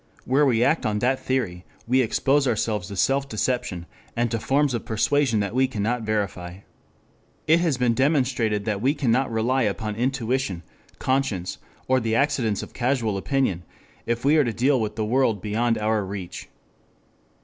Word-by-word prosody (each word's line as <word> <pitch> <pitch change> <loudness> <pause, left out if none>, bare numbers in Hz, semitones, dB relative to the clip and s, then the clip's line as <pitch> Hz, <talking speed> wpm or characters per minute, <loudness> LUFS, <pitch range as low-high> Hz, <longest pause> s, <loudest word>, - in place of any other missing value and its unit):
Where 140 +3 +3
we 120 -2 +3
act 160 - +2
on 105 -1 0
that 130 +5 +1
theory 110 -10 -2 0.2
we 130 +2 +3
expose 135 +4 +2
ourselves 110 -5 -1
to 100 - -7
self 135 +7 +1
deception, 110 -6 -2 0.3
and 120 0 0
to 115 - -1
forms 140 +4 +1
of 120 - -2
persuasion 115 0 +1
that 100 +1 -3
we 130 +1 +3
cannot 115 0 -2
verify. 100 -4 -3 0.8
It 160 +2 +4
has 165 -6 +1
been 125 -2 +2
demonstrated 125 -6 +1
that 105 -3 -2
we 135 +5 +2
cannot 130 -2 +1
rely 120 +4 +1
upon 105 -1 -1
intuition, 125 -6 -1 0.3
conscience, 130 -9 -1 0.3
or 130 0 +3
the 115 -2 -1
accidents 115 -6 +1
of - - -11
casual 120 -4 0
opinion 100 -4 0 0.5
if 120 +2 -1
we 150 +3 +5
are 150 - +5
to 120 - -1
deal 130 +3 +2
with 105 -1 -3
the 110 -1 -1
world 115 -2 +1
beyond 115 +4 0
our 110 0 0
reach. 95 -2 -7
120 Hz, 170 wpm, -24 LUFS, 105-130 Hz, 0.8 s, we